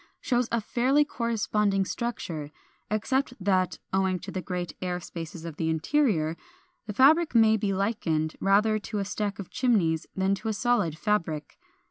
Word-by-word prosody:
440) - - -13
shows 245 -1 +2
a 230 -3 0
fairly 270 +4 +3
corresponding 210 -6 0
structure; 170 -11 -4 0.4
except 250 +5 0
that, 185 -2 +1 0.2
owing 190 -1 +2
to 190 +2 -8
the 185 - -3
great 180 -2 -4
air 180 -1 -2
spaces 165 -1 -8
of 160 -3 -7
the 160 - 0
interior, 160 - +1 0.5
the 210 - -3
fabric 300 - +5
may 220 -1 +6
be 205 -2 0
likened 185 -6 -1
rather 215 +2 +3
to 210 +1 -5
a 200 - -1
stack 205 0 -3
of 200 - -8
chimneys 185 -11 +1
than 190 +1 +1
to 205 +3 -4
a 220 - +1
solid 210 -7 +1
fabric. 165 -8 -2
200 Hz, 165 wpm, -27 LUFS, 175-230 Hz, 0.5 s, may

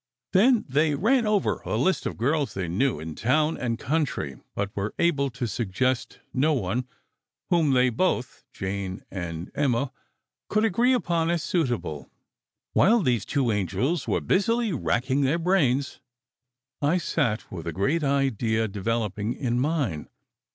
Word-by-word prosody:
Then 225 +4 +4
they 150 +2 +2
ran 230 - +2
over 210 -2 +1
a - - -3
list 190 +1 +1
of - - -3
the - - -18
girls 145 -6 +1
they 95 -2 -2
knew, 105 - 0
in 80 +1 -6
town 150 - +1
and 115 -2 -2
country, 130 - -2
but 100 0 -3
were 100 +1 -3
able 145 -5 +2
to 125 0 -4
suggest 120 +3 -1 0.2
no 150 +4 +2
one 125 0 -1 0.6
whom 160 -5 +3
they 125 -1 +4
both 125 -1 -1
Jane 95 -1 -4
and 85 -2 -5
Emma 135 -2 0 0.6
could 215 +1 +2
agree 235 +5 +3
upon 170 -9 +1
as 170 -2 0
suitable. 120 - -2 0.6
While 225 +4 +5
these 120 - +1
two 130 -5 +1
angels 125 - -1
were - - +1
busily 230 +2 +1
racking 130 0 0
their 140 +4 +2
brains, 150 -7 +1 0.8
I 150 +5 +3
sat 135 -10 -1
with 85 -3 -6
a - - -1
great 140 - 0
idea 120 -5 +1
developing 105 +1 -2
in 120 -3 -1
mine. 135 - -1
130 Hz, 150 wpm, -26 LUFS, 110-165 Hz, 0.8 s, While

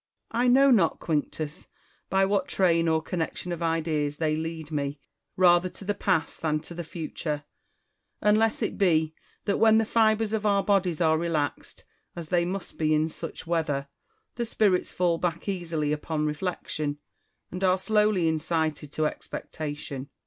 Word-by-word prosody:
Marciis. 230 - 0
I 250 - +3
know 270 +2 +6
not, 190 -9 +3
Quinctus, 155 -1 -3 0.4
by 195 0 +3
what 195 -1 +1
train 170 -3 +2
or 160 -1 +2
connec 165 -1 -2
tion 180 - -5
of 170 -1 -4
ideas 155 -3 0
they 155 -1 +1
lead 160 0 -5
me 145 -1 -2 0.4
rather 180 0 +5
to 195 - -12
the 205 - +1
past 180 -6 0
than 155 -1 +1
to 170 - -10
the 175 0 -5
future; 155 -2 -4 0.8
unless 215 +1 +3
it - - -3
be 160 -5 +3 0.3
that, 200 - +1
when 220 -1 +6
the 225 - +3
fibres 220 -1 +2
of 220 -1 0
our 200 -2 +3
bodies 185 -5 +1
are 160 -1 +3
relaxed, 160 -4 -3 0.3
as 170 -3 -7
they 175 -1 +2
must 190 +1 -5
be 155 -1 +3
in 155 +1 +1
such 165 +1 -7
weather, 155 -5 -1 0.5
the 240 - -1
spirits 205 -5 +1
fall 175 -2 +1
back 170 0 -2
easily 165 -6 -1
upon 150 0 -2
reflection, 150 -2 -3 0.5
and 185 +2 -5
are 185 0 +4
slowly 210 -3 +2
incited 160 -2 -1
to 155 - 0
expectation. 145 -3 -5
170 Hz, 165 wpm, -27 LUFS, 155-195 Hz, 0.8 s, know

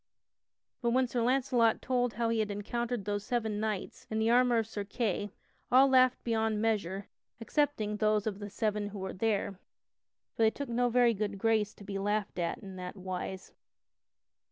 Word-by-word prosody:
But 235 - +1
when 260 +1 +4
Sir 240 0 -1
Launcelot 245 -2 +3
told 245 -3 0
how 230 +1 0
he 230 -1 +1
had 215 -1 0
encountered 230 +2 -3
those 205 0 -2
seven 220 -2 -1
knights, 215 -3 -4
in 220 - -2
the 220 +1 +2
armor 245 0 +4
of 225 - +1
Sir 210 -2 -5
Kay, 205 -1 -2 0.4
all 260 +2 +7
laughed 255 -1 +4
beyond 220 -2 0
measure 200 -3 -1 0.3
excepting 230 -4 0
those 215 -1 +2
of 205 -2 -3
the 205 0 -6
seven 210 0 -1
who 205 0 -7
were 190 0 -4
there, 200 -2 -1 0.7
for - - -4
they 220 - +6
took 280 +4 -6
no 245 +1 +2
very 240 -1 +4
good 205 -1 -3
grace 215 0 +1
to - - -13
be 195 -1 -4
laughed 205 -1 -1
at 170 -1 -1
in 195 -2 -10
that 180 +1 -6
wise. 185 0 -5
220 Hz, 180 wpm, -31 LUFS, 205-235 Hz, 0.7 s, all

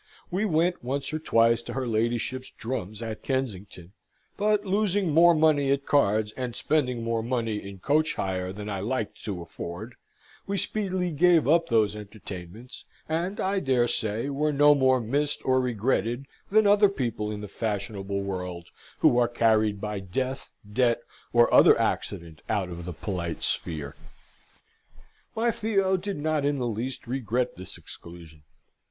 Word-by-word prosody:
We 190 +5 0
went 175 - +1
once 140 +4 -3
or 155 - -1
twice 115 -5 +3
to - - -7
her 135 -1 -2
ladyship's 120 +3 -1
drums 110 -3 -5
at 110 -1 -5
Kensington; 100 -9 -4 0.4
but, 210 0 +1
losing 200 -2 +1
more 170 +2 +7
money 155 -3 +3
at 140 0 0
cards, 110 -6 +2
and 125 -2 -4
spending 125 -6 0
more 115 0 0
money 115 -2 -1
in 100 -1 -8
coach 150 - +1
hire 95 -1 -2
than 105 +2 -7
I 100 -2 -3
liked 110 +2 -3
to 95 -5 -4
afford, 85 +7 -7 0.5
we 200 0 -1
speedily 185 -2 -1
gave 165 0 +4
up 165 +2 +4
those 110 -3 +2
entertainments, 105 +1 -9 0.2
and, 175 +6 -2
I 195 +1 +1
dare 130 -6 +2
say, 110 +2 -1
were 150 +2 0
no 145 +1 +6
more 130 -2 +3
missed 140 +6 -1
or 130 0 +3
regretted 120 +1 0 0.2
than 215 +1 +4
other 205 0 +6
people 115 - -3
in 105 -1 -5
the 105 - -6
fashionable 100 -2 -3
world, 90 -3 -5 0.3
who 120 - +5
are 120 - +4
carried 110 -3 +2
by 105 0 -3
death, 130 +8 -3 0.2
debt, 120 +2 +1 0.3
or 120 0 +4
other - - +7
accident 80 -2 -2
out 95 -3 0
of 85 -1 -7
the 90 - -5
polite 85 -1 -4
sphere. 75 -4 -3 1.4
My 230 +1 +2
Theo 195 -4 +1
did 195 0 -3
not 155 0 0
in 145 0 +1
the 125 - -2
least 120 +3 -4
regret 125 0 -1
this 95 - -9
exclusion. 85 -3 -12
120 Hz, 160 wpm, -27 LUFS, 105-150 Hz, 1.4 s, more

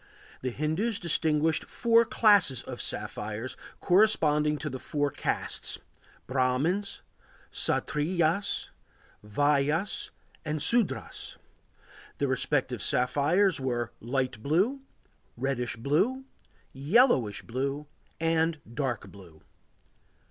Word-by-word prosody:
The 130 - -1
Hindus 160 - -1
distinguished 160 -2 +1
four 230 0 +3
classes 205 - +4
of 125 -2 -6
sapphires, 105 +3 -4 0.3
corresponding 155 -7 +3
to 150 - -5
the 130 -3 -5
four 145 +1 -1
castes: - - -2 0.5
Brahmins, 140 +10 0 0.5
Kshatriyas, 170 +5 0 0.5
Vaisyas, 145 - +1 0.3
and 150 0 -2
Sudras. 225 +8 -1 0.8
The 140 - 0
respective 130 -3 -1
sapphires 145 - +2
were 120 -3 -2
light 130 -2 -2
blue, 190 - +1 0.6
reddish 125 -1 -1
blue, 160 - 0 0.5
yellowish 140 - +3
blue, 135 +4 -3 0.3
and 165 -1 +1
dark 130 -3 -3
blue. 85 -6 -15
150 Hz, 90 wpm, -28 LUFS, 130-175 Hz, 0.8 s, classes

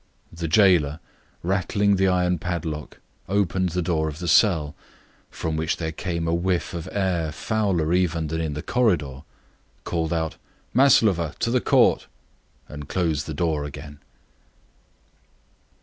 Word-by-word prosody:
The 85 0 -4
jailer, 85 -5 +4 0.4
rattling 100 +2 +1
the 95 0 +3
iron 90 -1 +1
padlock, 80 -3 -4 0.3
opened 95 -2 +1
the 90 +1 -2
door 80 -2 0
of 75 -1 -5
the 90 +1 -5
cell, 80 -4 +3 0.6
from 80 -1 -4
which 80 +1 -1
there 80 -2 -3
came 85 0 -3
a 80 - +1
whiff 85 -2 -1
of 85 +1 -5
air 90 -6 -1
fouler 90 -2 0
even 85 -3 +1
than 80 +2 -3
that - - -1
in 80 -2 -3
the 75 - -5
corridor, 85 - +1
and 75 - -34
called 80 -2 -2
out, 80 -2 -2 0.4
"Maslova! 105 - +4
to 115 - -1
the 125 0 +2
Court," - - +3 0.6
and 75 -1 -9
closed 80 -5 -1
the 80 - -5
door 80 -2 0
again. 75 0 -9
85 Hz, 150 wpm, -24 LUFS, 80-95 Hz, 0.6 s, jailer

